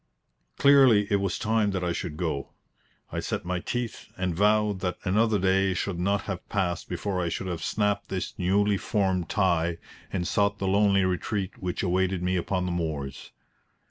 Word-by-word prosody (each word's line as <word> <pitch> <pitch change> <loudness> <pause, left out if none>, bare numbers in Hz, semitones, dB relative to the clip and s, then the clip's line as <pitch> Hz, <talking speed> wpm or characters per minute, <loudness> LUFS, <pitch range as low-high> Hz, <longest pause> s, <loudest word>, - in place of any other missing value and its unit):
Clearly, 135 -7 +6
it 100 - +4
was 100 -2 -1
time 110 -1 +1
that 95 -1 -2
I 90 - 0
should 85 -5 -4
go. 80 -6 -3 0.6
I - - -2
set - - -3
my 90 0 -1
teeth 120 +4 -4
and 90 -1 -1
vowed 105 +2 +2
that 90 -1 -2
another 105 +3 +2
day 95 0 +2
should 90 0 -2
not 100 +3 +1
have 95 -3 -6
passed 90 -4 -1
before 90 +1 -2
I 85 - -1
should 95 - -3
have 90 -3 -4
snapped 105 -1 0
this 95 -1 -3
newly 100 +3 +2
formed 95 -4 0
tie 85 -4 +1 0.3
and 90 -2 -2
sought 100 -1 +1
the 95 - -2
lonely 100 0 +3
retreat 95 +1 -2
which 90 0 -2
awaited 95 0 +1
me 90 +1 +1
upon 90 +1 -1
the 90 - -2
moors. 80 -6 -4
95 Hz, 175 wpm, -27 LUFS, 90-100 Hz, 0.6 s, Clearly